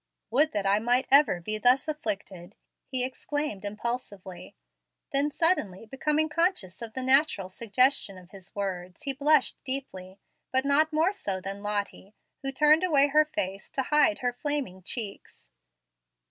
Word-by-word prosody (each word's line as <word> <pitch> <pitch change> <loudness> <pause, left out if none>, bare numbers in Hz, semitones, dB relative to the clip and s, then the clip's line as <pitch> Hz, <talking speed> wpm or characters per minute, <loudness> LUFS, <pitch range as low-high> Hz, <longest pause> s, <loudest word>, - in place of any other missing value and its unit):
"Would 295 +6 +3
that 205 -2 -2
I 200 +1 +3
might 245 +3 +1
be 270 - +6
ever 280 - +3 0.2
thus 255 +5 +4
afflicted!" 200 - -5 0.3
he 255 -1 0
exclaimed 275 -4 -4
impulsively. 205 -3 -5 0.6
Then, 280 +2 +3
suddenly 280 - +1
becoming 300 +6 0
conscious 315 - -1
of 225 -1 -6
the 260 - -3
natural 260 -8 +2
suggestion 235 0 +1
of 180 -1 -16
his 195 -2 -12
words, 185 +2 -5
he 275 -2 0
blushed 295 +1 +2
deeply; 200 -9 -4 0.3
but 260 +1 +2
not 300 +3 +3
more 320 +5 +2
so 200 - -3
than 195 +2 -6
Lottie, 205 -1 -4 0.3
who 270 - -2
turned 300 +4 +4
away 290 -5 +4
her 305 +2 +4
face 195 -9 -4
to 265 - -2
hide 300 +1 +4
her 245 - +1
flaming 270 -9 -3
cheeks. 200 - -6
250 Hz, 150 wpm, -27 LUFS, 195-295 Hz, 0.6 s, be